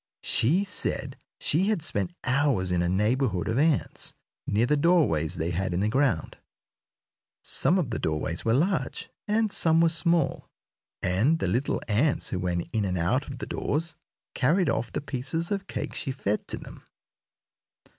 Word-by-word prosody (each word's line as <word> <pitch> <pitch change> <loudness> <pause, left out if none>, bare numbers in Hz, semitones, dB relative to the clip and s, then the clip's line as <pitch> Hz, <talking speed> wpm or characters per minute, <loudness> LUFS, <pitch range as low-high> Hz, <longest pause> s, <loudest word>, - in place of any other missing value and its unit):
She 140 - +2
said 190 -2 -2 0.2
she 175 +7 +2
had 210 -8 0
spent 170 - 0
hours 130 -8 +1
in 90 -1 +2
a 85 - 0
neighborhood 105 0 +1
of 110 +4 0
ants, 155 -2 +1 0.3
near 110 +4 +2
the 150 - +2
doorways 145 - +2
they 80 +1 -2
had 90 0 -1
in - - 0
the 105 +2 +1
ground. 125 - 0 1.0
Some 180 - +2
of 155 -10 -1
the 110 - -2
doorways 80 +2 -2
were 115 +1 +2
large, 170 +6 -1 0.2
and 215 0 +1
some 165 -3 +4
were 165 0 +5
small, 170 -2 +1 0.5
and 105 - +2
the 95 - -1
little 120 +10 0
ants 120 +7 +1
who 90 - -1
went 85 -1 -2
in 110 -2 +1
and 90 -2 -1
out 95 - 0
of 135 - -7
the - - -5
doors 160 +3 -2 0.4
carried 170 +8 +2
off 115 - -2
the - - -3
pieces 145 +6 -3
of 200 -1 -2
cake - - -4
she 140 - -4
fed 105 -6 -2
to - - -4
them. - - -11
130 Hz, 170 wpm, -27 LUFS, -, 1.0 s, were